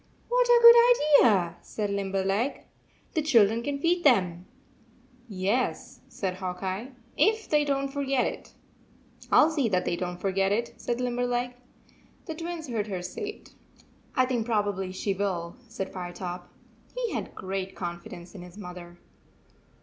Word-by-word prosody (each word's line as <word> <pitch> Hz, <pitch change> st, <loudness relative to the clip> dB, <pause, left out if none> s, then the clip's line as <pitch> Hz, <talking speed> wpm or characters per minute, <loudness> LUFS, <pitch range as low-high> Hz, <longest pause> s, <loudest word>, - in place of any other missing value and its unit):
"What -, -, +3 dB
a 485 Hz, 0 st, +6 dB
good 470 Hz, -11 st, +8 dB
idea!" 180 Hz, -7 st, +3 dB
said 205 Hz, -2 st, -4 dB
Limberleg. 195 Hz, +5 st, -1 dB, 0.5 s
"The 315 Hz, -, +1 dB
children 230 Hz, -7 st, +4 dB
can 280 Hz, +3 st, -2 dB
feed 345 Hz, +4 st, +1 dB
them." 185 Hz, -, +3 dB, 0.8 s
"Yes," 200 Hz, +6 st, -1 dB
said 190 Hz, -2 st, -3 dB
Hawk 185 Hz, 0 st, -5 dB
Eye, 195 Hz, +8 st, -4 dB, 0.2 s
"if 435 Hz, +1 st, +2 dB
they 300 Hz, -1 st, +3 dB
don 275 Hz, -1 st, 0 dB
t 275 Hz, -, -6 dB
forget 275 Hz, -2 st, +1 dB
it." -, -, -6 dB, 0.8 s
"I -, -, +6 dB
11 315 Hz, +2 st, +3 dB
see 270 Hz, -7 st, +1 dB
that 185 Hz, -3 st, +1 dB
they 175 Hz, -, 0 dB
don 180 Hz, 0 st, -4 dB
t 175 Hz, -, -16 dB
forget 195 Hz, 0 st, +1 dB
it," 235 Hz, +3 st, -1 dB
said 240 Hz, 0 st, -2 dB
Limberleg. 245 Hz, 0 st, -1 dB, 0.7 s
The 320 Hz, -, -4 dB
Twins 330 Hz, 0 st, -6 dB
heard 220 Hz, -4 st, -2 dB
her 185 Hz, -3 st, -4 dB
say 180 Hz, -, -5 dB
it. 425 Hz, -, -12 dB, 0.3 s
" -, -, -31 dB
I 255 Hz, -, +4 dB
think 250 Hz, -3 st, -1 dB
probably 205 Hz, -4 st, 0 dB
she 195 Hz, +1 st, -2 dB
will," 180 Hz, -4 st, -3 dB
said 195 Hz, -4 st, -6 dB
Fire 180 Hz, -2 st, -6 dB
top. 175 Hz, 0 st, -7 dB, 0.4 s
He -, -, -2 dB
had -, -, -4 dB
great 190 Hz, 0 st, -4 dB
confidence 175 Hz, 0 st, -7 dB
in 190 Hz, -, -9 dB
his 180 Hz, +2 st, -12 dB
mother. 180 Hz, -3 st, -9 dB
210 Hz, 165 wpm, -27 LUFS, 185-275 Hz, 0.8 s, good